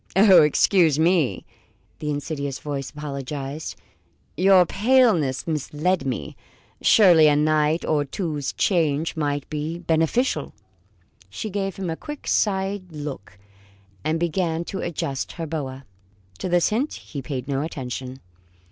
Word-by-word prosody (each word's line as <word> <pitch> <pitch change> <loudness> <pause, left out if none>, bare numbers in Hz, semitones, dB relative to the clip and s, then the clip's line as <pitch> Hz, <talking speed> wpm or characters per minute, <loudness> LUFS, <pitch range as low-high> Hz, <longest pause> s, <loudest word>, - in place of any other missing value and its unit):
"Ah, 195 -1 +7
excuse 155 +1 +4
me!" 165 -4 +2 0.5
the 150 - -3
insidious 145 -1 -3
voice 140 -2 -5
apologized, 140 0 -6 0.6
"your 185 0 +5
paleness 205 - +2
misled 155 +1 -1
me. 125 - -4 0.5
Surely 175 -7 +6
a 145 - +4
night 155 +1 +2
or 150 -2 +1
two's 150 -2 -3
change 160 -4 +1
might 145 -2 -2
be 155 +2 -4
beneficial." 165 - 0 0.7
She 215 - -5
gave 195 -1 -2
him 185 -4 -3
a - - -2
quick 295 - -9
side 195 -2 0
look, 145 - -7 0.7
and 160 +1 0
began 170 -1 -1
to 190 - -5
adjust 140 -5 -3
her 165 - -5
boa. 140 -4 -5 0.5
To - - -3
this 175 -1 +3
hint 250 +8 -1
he 140 - -8
paid 130 -1 -5
no 135 -1 -1
attention. 130 -3 -6
155 Hz, 130 wpm, -23 LUFS, 145-185 Hz, 0.7 s, Ah